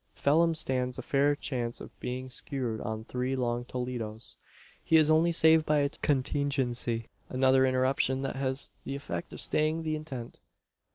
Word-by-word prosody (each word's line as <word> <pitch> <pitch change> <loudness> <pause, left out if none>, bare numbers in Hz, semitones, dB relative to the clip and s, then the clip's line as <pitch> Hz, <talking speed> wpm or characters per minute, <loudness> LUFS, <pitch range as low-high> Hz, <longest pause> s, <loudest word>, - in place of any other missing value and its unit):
Phelim 165 +3 +3
stands 125 -4 -1
a - - -5
fair 145 +1 +2
chance 120 -5 -3
of - - -11
being 130 +1 -5
skewered 125 -5 -2
on 110 -1 -4
three 125 +3 -2
long 120 -1 -1
Toledos. 120 -3 -4 0.5
He 160 - +4
is 155 0 +5
only 165 +2 +4
saved 160 -1 +5
by 150 - +3
a 140 - +1
contingency 130 -5 0 0.2
another 130 0 +4
interruption 130 +1 +1
that 135 - -3
has 135 0 -1
the 135 - -4
effect 85 -12 -5
of - - -8
staying 155 +2 +1
the 155 -1 -1
intent. 135 -6 -7
130 Hz, 160 wpm, -29 LUFS, 125-145 Hz, 0.5 s, is